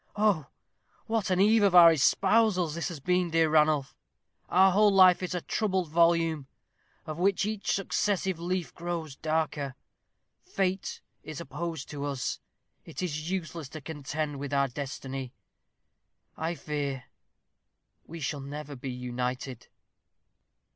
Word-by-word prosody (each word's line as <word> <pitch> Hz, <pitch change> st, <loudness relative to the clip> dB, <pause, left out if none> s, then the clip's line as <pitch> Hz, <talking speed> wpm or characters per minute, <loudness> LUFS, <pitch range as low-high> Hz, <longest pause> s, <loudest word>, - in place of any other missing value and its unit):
Oh, 205 Hz, -9 st, +2 dB, 0.6 s
what 220 Hz, -4 st, -1 dB
an 185 Hz, -1 st, +1 dB
eve 215 Hz, +3 st, +5 dB
of 200 Hz, -3 st, +4 dB
our 170 Hz, -1 st, +10 dB
espousals 185 Hz, +2 st, +3 dB
has 170 Hz, +1 st, -3 dB
this 170 Hz, -5 st, -6 dB
been, 180 Hz, +3 st, +1 dB
dear 160 Hz, -1 st, +2 dB
Ranulph. 150 Hz, -3 st, +3 dB, 0.5 s
Our 190 Hz, +2 st, +5 dB
whole 210 Hz, +3 st, +5 dB
life 185 Hz, -2 st, +6 dB
is 180 Hz, 0 st, -3 dB
a 175 Hz, -, -2 dB
troubled 190 Hz, -5 st, -1 dB
volume, 165 Hz, -3 st, +2 dB, 0.6 s
of 155 Hz, +1 st, -6 dB
which 195 Hz, +1 st, +2 dB
each 215 Hz, -1 st, -2 dB
successive 195 Hz, -2 st, 0 dB
leaf 180 Hz, +1 st, -2 dB
grows 170 Hz, -4 st, -5 dB
darker. 155 Hz, -3 st, -2 dB, 0.7 s
Fate 190 Hz, -, -2 dB, 0.2 s
is 155 Hz, -2 st, -8 dB
opposed 165 Hz, -1 st, -5 dB
to 145 Hz, -1 st, -4 dB
us. 140 Hz, -2 st, -3 dB, 0.4 s
It -, -, -7 dB
is 155 Hz, -2 st, -3 dB
useless 170 Hz, -5 st, -4 dB
to 155 Hz, 0 st, -8 dB
contend 145 Hz, 0 st, -4 dB
with 140 Hz, 0 st, -3 dB
our 140 Hz, 0 st, +3 dB
destiny. 135 Hz, -1 st, -6 dB, 1.0 s
I 165 Hz, +2 st, -2 dB
fear 140 Hz, -3 st, -3 dB, 1.0 s
we 165 Hz, 0 st, -8 dB
shall 145 Hz, 0 st, -3 dB
never 145 Hz, +1 st, -7 dB
be 130 Hz, +1 st, -6 dB
united." 125 Hz, 0 st, -4 dB
160 Hz, 135 wpm, -28 LUFS, 145-185 Hz, 1.0 s, our